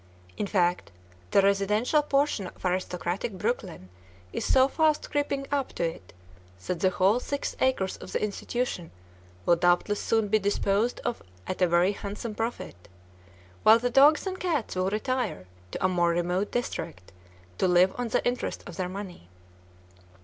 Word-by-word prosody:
In 205 - -2
fact, 180 - +1 0.4
the 195 - +4
residential 210 +9 +2
portion 280 -8 0
of - - -12
aristocratic 180 +2 -2
Brookline 185 - -3 0.4
is - - -2
so 260 0 +6
fast 310 +1 +1
creeping 285 -2 -1
up 280 -2 -1
to - - -2
it 165 - -4 0.5
that 180 - -2
the 185 - +3
whole 190 +5 +2
six 285 +2 -3
acres 255 -8 +1
of - - -10
the - - -1
institution 210 -3 -3 0.6
will 170 - +4
doubtless 175 +4 +2
soon 225 -2 +1
be 215 +2 +3
disposed 205 +3 0
of 240 - -2 0.2
at 185 - -5
a 180 - +5
very 175 +3 +3
handsome 205 +2 -6
profit, 225 - -5 0.7
while 220 +1 +7
the 245 +1 -1
dogs 285 +7 +6
and 375 -1 -4
cats 315 - -1
will 185 +1 +1
retire 215 - -2 0.2
to 185 - -2
a - - +6
more 175 -2 +2
remote 175 +3 0
district 90 - -4 0.5
to - - +3
"live 180 +1 +4
on 245 - -1
the 225 - 0
interest 245 +1 -3
of 175 - -9
their 180 -1 -2
money." 185 - -8
200 Hz, 160 wpm, -27 LUFS, 180-245 Hz, 0.7 s, while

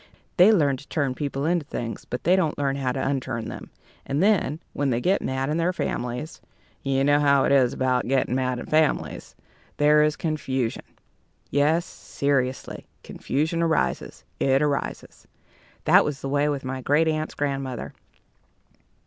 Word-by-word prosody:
They 185 +4 +7
learn 145 -10 +3
to 145 - -14
turn 140 -4 -1
people 140 0 -3
into 170 0 +1
things, 120 -5 -6
but 125 - -5
they 180 +3 +4
don't 165 -5 0
learn 140 -1 0
how 135 -2 -1
to 130 - -2
unturn 130 -4 -2
them; - - -8 0.3
and 140 +5 -1
then, 190 -8 +2
when 145 -1 0
they 120 -2 +1
get 185 +9 +1
mad 130 0 -2
in 150 +2 -1
their 170 +2 +1
families 125 +1 -4 0.4
you 135 0 0
know 145 +1 +4
how 140 -2 +4
it - - +1
is 130 -3 +4
about 130 -1 0
getting 130 -1 +1
mad 130 -1 0
in 120 - -6
families 155 -1 0 0.4
there 150 +1 +5
is 150 0 +2
confusion. 135 -7 -2 0.7
Yes, 155 +4 +2
seriously, 135 -2 -2 0.2
confusion 160 +4 -2
arises. 165 -1 -1 0.2
It 135 +1 +3
arises. 145 -2 -3 0.6
That - - +6
was 145 -2 -4
the 135 - -4
way 145 +1 +1
with 140 -2 -2
my 130 0 -4
great 150 +5 +2
aunt's 155 0 -2
grandmother. 135 -3 -3
140 Hz, 165 wpm, -24 LUFS, 130-155 Hz, 0.7 s, They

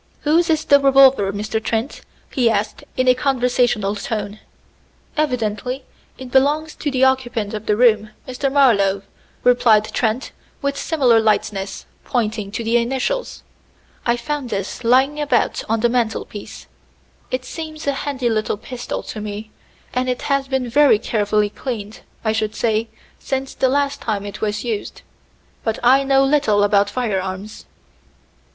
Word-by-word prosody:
"Whose 330 +3 +2
is 315 -1 +1
the 285 - +6
revolver, 270 -7 +5
Mr. 215 +2 -3
Trent?" 225 +5 -2 0.3
he 245 -4 +2
asked 210 -1 -2
in 255 0 +1
a 255 - +7
conversational 245 -5 +1
tone. 210 0 -4 0.8
"Evidently 250 -3 -1 0.3
it 255 -1 -9
belongs 295 +4 +2
to 295 - -3
the 265 -1 +1
occupant 245 -5 +1
of 215 0 -6
the 210 - +2
room, 215 -3 +4 0.2
Mr. 260 +2 -2
Marlowe," 200 -8 +3 0.4
replied 235 -4 +4
Trent 240 +2 -1 0.3
with 280 0 -1
similar 265 -7 +3
lightness, 210 -3 -1 0.2
pointing 220 -4 -2
to 225 +3 -4
the 230 +1 +2
initials. 265 - -2 0.6
"I 235 0 +1
found 275 +1 -4
this 200 +3 -4
lying 265 +5 +3
about 270 -5 +1
on 225 0 +1
the 240 - +4
mantel 235 -2 0
piece. 205 - -10 0.6
It 255 0 -3
seems 310 +2 -7
a 280 - +1
handy 270 -2 -2
little 215 -2 0
pistol 245 +3 -6
to 215 - -7
me, 210 +1 -6 0.4
and 255 +1 0
it 250 - -2
has 275 -1 0
been 265 -2 -1
very 280 -1 +5
carefully 210 -1 0
cleaned, 215 -5 -6 0.3
I 220 - +3
should 215 -1 -1
say, 225 0 0 0.3
since 270 0 -3
the 260 - +1
last 280 +1 0
time 205 -3 -2
it 205 0 -8
was 210 -1 -1
used. 225 -4 -4 0.6
But 225 -1 -1
I 265 +3 +5
know 270 0 +4
little 270 -8 +3
about 205 0 +3
firearms." 200 -3 -3
240 Hz, 150 wpm, -20 LUFS, 215-270 Hz, 0.8 s, a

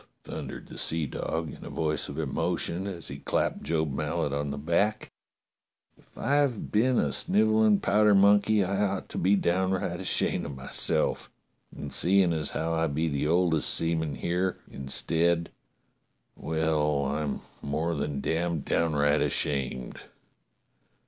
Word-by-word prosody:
thundered - - -7
the - - -8
seadog 80 0 -2
in - - -13
a - - -7
voice 75 -2 -1
of - - -7
emotion 90 +4 -2
as 90 -4 -6
he 70 +1 -7
clapped - - -1
Job 80 -2 -1
Mallet 70 +1 -2
on 70 0 -2
the 70 - -4
back, 85 +9 0 0.8
"if - - -26
I've 140 -3 0
been 120 +4 +3
a 70 - +1
snivellin' 110 -1 +3
powder 105 0 +4
monkey 100 +1 +5
I 100 +2 -1
ought 100 - -2
to - - -4
be 95 +3 +3
downright 95 0 0
ashamed - - 0
of 70 - -7
myself, 65 - -1 0.4
and 70 -1 -7
seein' 95 -1 +4
as 80 -2 0
how 80 +1 -2
I 80 0 +1
be 80 +3 -1
the 70 0 -1
oldest 85 -1 +3
seaman 80 -3 -1
here, 90 +7 -1
instead 85 +5 0 0.4
— - - -48
well, 75 -3 0
I'm 75 +1 -2 0.2
more 80 +4 -1
than 70 -2 -3
damned 85 -2 -1
downright 75 -2 +2
ashamed. 65 -3 -1
80 Hz, 140 wpm, -28 LUFS, 75-95 Hz, 0.8 s, monkey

